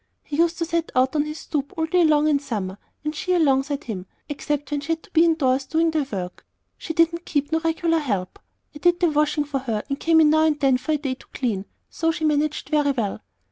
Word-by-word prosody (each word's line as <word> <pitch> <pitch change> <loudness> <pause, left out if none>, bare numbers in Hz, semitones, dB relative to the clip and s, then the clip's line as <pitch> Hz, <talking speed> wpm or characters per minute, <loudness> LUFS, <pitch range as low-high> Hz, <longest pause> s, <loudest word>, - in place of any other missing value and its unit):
He 295 - -5
used 335 0 +2
to 335 - -1
set 335 0 -2
out 260 +3 +2
on 295 0 +2
this 305 +1 -6
stoop 290 -2 -3
all 320 - +1
day 350 +2 +3
long 305 -1 +4
in 300 -2 +4
the 280 - -9
summer, 205 -7 -4 0.2
and 305 0 -2
she 365 +4 -1
alongside 280 -2 +2
him, 190 -5 -6 0.2
except 290 -1 -3
when 290 -1 -1
she 320 +3 -1
had 325 - -6
to - - -19
be 325 0 +5
indoors 275 -5 +2
doing 325 +1 +2
the 305 -4 0
work. 180 -3 -5 0.4
She - - -5
didn't 335 +1 +2
keep 290 -2 -1
no 320 - +2
regular 330 0 +1
help. 200 -11 -3 0.4
I - - -8
did 350 +2 +3
the 345 -3 +3
washing 300 0 +1
for 285 -2 -3
her, 225 -5 -3
and 275 0 -2
come 325 -1 +4
in 305 -1 +6
now 315 0 +4
and 300 -2 +1
then 265 -2 +3
for 310 - -1
a - - +2
day 275 -3 -3
to 255 - -15
clean; 210 -7 -1 0.3
so 325 0 0
she 320 -1 -3
managed 300 0 0
very 295 -2 +2
well. 235 -8 -1
300 Hz, 250 wpm, -23 LUFS, 270-320 Hz, 0.4 s, in